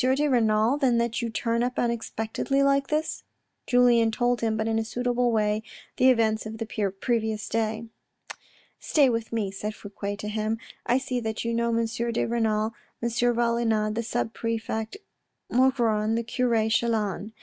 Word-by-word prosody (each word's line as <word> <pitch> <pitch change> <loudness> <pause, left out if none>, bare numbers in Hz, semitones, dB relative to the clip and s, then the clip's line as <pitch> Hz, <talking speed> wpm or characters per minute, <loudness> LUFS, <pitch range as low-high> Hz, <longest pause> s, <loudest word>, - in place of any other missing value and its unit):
de 295 +2 +1
Renal 230 0 +2
then 255 -4 +3
that 235 +2 0
you 235 - -2
turn 230 +1 -1
up 250 +1 -1
unexpectedly 235 +3 -1
like 275 0 +2
this? 305 +1 -1 0.2
" - - -52
Julien 245 -2 +4
told 245 +2 0
him, 220 -1 0
but 220 0 -1
in 225 0 +1
a - - 0
suitable 245 +1 0
way, 210 -1 +1 0.4
the 260 - +5
events 220 -3 +2
of 220 +1 -7
the 225 - -3
previous 215 +1 -1
day. 225 0 -1 0.5
" - - -32
Stay 280 -5 +5
with 230 -1 -3
me," 215 -4 -1
said 210 +2 -5
Fouque 205 0 -6
to 210 - -6
him. 215 +1 -1 0.2
" - - -30
I 245 - +4
see 260 -2 -2
that 220 -1 -3
you 230 - 0
know 235 0 +1
M. 230 0 +1
de 235 +1 -1
Renal, 220 -1 0 0.3
M. 235 - -1
Valenod, 235 -2 +1
the 230 - -1
sub 230 0 -2
prefect 225 - -3 0.5
Maugron, 235 -4 +2
the 230 - 0
cure 230 -2 +1
Chelan. 220 -3 0
230 Hz, 175 wpm, -26 LUFS, 220-240 Hz, 0.5 s, the